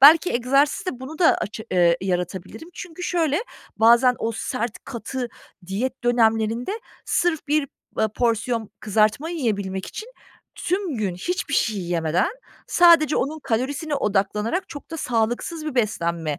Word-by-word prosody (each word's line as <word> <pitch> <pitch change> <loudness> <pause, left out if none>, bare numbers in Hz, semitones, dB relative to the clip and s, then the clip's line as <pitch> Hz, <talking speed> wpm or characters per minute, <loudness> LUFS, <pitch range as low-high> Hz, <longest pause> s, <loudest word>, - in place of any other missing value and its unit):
Belki 315 +6 +8
egzersizle 275 +3 +1
bunu 290 +4 -8
da 345 - +6
aça 220 +1 -5
eee, 175 -2 +4
yaratabilirim. 185 - -3
Çünkü 360 -1 -8
şöyle 325 -4 +1 0.4
bazen 235 +3 +6
o 230 0 -1
sert, 235 0 -3
katı 255 -1 -4 0.4
diyet 240 +8 -3
dönemlerinde 230 - +2 0.3
sırf 320 -4 0
bir, 295 -1 +2 0.3
eee, 220 - +3
porsiyon 230 -2 0
kızartma 215 - +1
yiyebilmek 200 - -2
için 440 +3 -7 0.5
tüm 365 -4 -1
gün 200 -5 -1
hiçbir 290 - -2
şey 220 -2 +2
yemeden 170 - +1 0.4
sadece 335 -4 +6
onun 300 +4 -1
kalorisine 285 +6 -1
odaklanarak 210 - 0
çok 295 -2 -10
da 325 - -4
sağlıksız 245 +6 -1
bir 305 - -3
beslenme, 170 - 0
240 Hz, 130 wpm, -23 LUFS, 210-305 Hz, 0.5 s, Belki